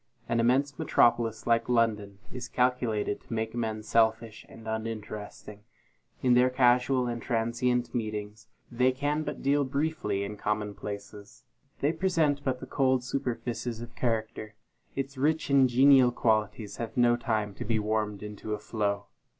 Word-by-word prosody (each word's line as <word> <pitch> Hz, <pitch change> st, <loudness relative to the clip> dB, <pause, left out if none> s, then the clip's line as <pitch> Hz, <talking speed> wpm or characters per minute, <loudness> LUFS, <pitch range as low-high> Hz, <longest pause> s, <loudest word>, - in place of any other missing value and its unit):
An 115 Hz, -, 0 dB
immense 130 Hz, +4 st, +2 dB
metropolis, 115 Hz, -2 st, +2 dB
like 115 Hz, 0 st, +2 dB
London, 105 Hz, -4 st, +1 dB, 0.2 s
is 125 Hz, -1 st, -5 dB
calculated 125 Hz, -5 st, 0 dB
to -, -, -19 dB
make 110 Hz, 0 st, -2 dB
men 110 Hz, -2 st, -3 dB
selfish 110 Hz, 0 st, +1 dB
and 110 Hz, -, -12 dB
uninteresting. 110 Hz, -2 st, -6 dB, 0.6 s
In 125 Hz, -1 st, +4 dB
their 125 Hz, +1 st, +5 dB
casual 125 Hz, 0 st, +3 dB
and 120 Hz, -1 st, -3 dB
transient 120 Hz, +1 st, 0 dB
meetings, 105 Hz, -1 st, -4 dB, 0.2 s
they 125 Hz, +2 st, +2 dB
can 145 Hz, +3 st, -1 dB
but -, -, -5 dB
deal 145 Hz, +1 st, +3 dB
briefly 140 Hz, -8 st, -1 dB
in 105 Hz, +1 st, -6 dB
commonplaces. 105 Hz, -1 st, -5 dB, 0.4 s
They 145 Hz, +3 st, +2 dB
present 160 Hz, -5 st, +1 dB
but 130 Hz, -2 st, -1 dB
the 130 Hz, -, -7 dB
cold 130 Hz, -1 st, +1 dB
superfices 120 Hz, -2 st, -3 dB
of 120 Hz, 0 st, -9 dB
character 110 Hz, -2 st, -2 dB, 0.4 s
its 135 Hz, 0 st, -4 dB
rich 155 Hz, +1 st, +1 dB
and 135 Hz, -2 st, +5 dB
genial 130 Hz, 0 st, +6 dB
qualities 110 Hz, -2 st, 0 dB
have 115 Hz, +1 st, -5 dB
no 120 Hz, -1 st, +5 dB
time 110 Hz, -4 st, -1 dB
to -, -, -6 dB
be 110 Hz, +1 st, 0 dB
warmed 105 Hz, -1 st, -1 dB
into 105 Hz, 0 st, -5 dB
a -, -, -9 dB
flow. 105 Hz, -1 st, -2 dB
115 Hz, 150 wpm, -28 LUFS, 110-130 Hz, 0.6 s, genial